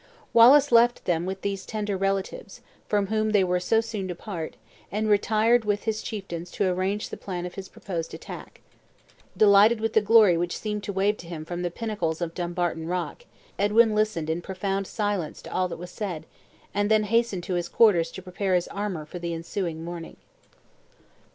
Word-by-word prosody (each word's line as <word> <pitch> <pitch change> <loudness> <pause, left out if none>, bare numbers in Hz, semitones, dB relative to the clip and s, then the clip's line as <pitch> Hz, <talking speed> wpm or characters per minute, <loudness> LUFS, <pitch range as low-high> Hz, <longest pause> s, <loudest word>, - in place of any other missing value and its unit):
Wallace 270 +5 +7
left 235 +1 +4
them 175 0 0
with 190 0 -4
these 195 -1 -2
tender 210 -2 -3
relatives, 195 - -3 0.3
from 205 -1 +1
whom 215 +1 0
they 200 -2 +5
were 180 0 +1
so 225 +5 +2
soon 220 -4 -4
to 180 - -4
part, 170 -4 -6 0.4
and 215 +2 -1
retired 220 +3 +3
with 205 -1 -1
his 220 -1 -1
chieftains 185 -6 -6
to 200 - +1
arrange 185 +3 -1
the - - -7
plan 180 -2 -5
of 180 - -6
his 190 -1 -8
proposed 170 -4 -5
attack. - - -10 0.8
Delighted 210 +2 +6
with 225 0 -1
the 220 - +5
glory 210 -4 +6
which 175 +1 -2
seemed 210 -1 -3
to - - -3
wave 200 +2 +1
to 170 - -11
him 160 -2 -6
from 175 +1 -4
the 175 - -1
pinnacles 175 -5 -3
of 170 -2 -3
Dumbarton 175 -2 -2
Rock, 180 - -3 0.3
Edwin 215 +2 +4
listened 210 -7 0
in 160 +2 -1
profound 195 +1 -3
silence 205 -7 -2
to - - -9
all 185 0 +1
that - - -6
was 180 +1 -9
said, 180 -6 -5 0.5
and 205 +1 +1
then 215 -1 +4
hastened 225 -3 +1
to 185 - -3
his 175 -1 -2
quarters 195 -8 +4
to 190 - -8
prepare 185 +1 -1
his 175 - +1
armor 200 -6 -4
for 175 +4 -8
the 170 -1 -3
ensuing 165 -1 -4
morning. 170 -1 -7
195 Hz, 190 wpm, -26 LUFS, 175-215 Hz, 0.8 s, Wallace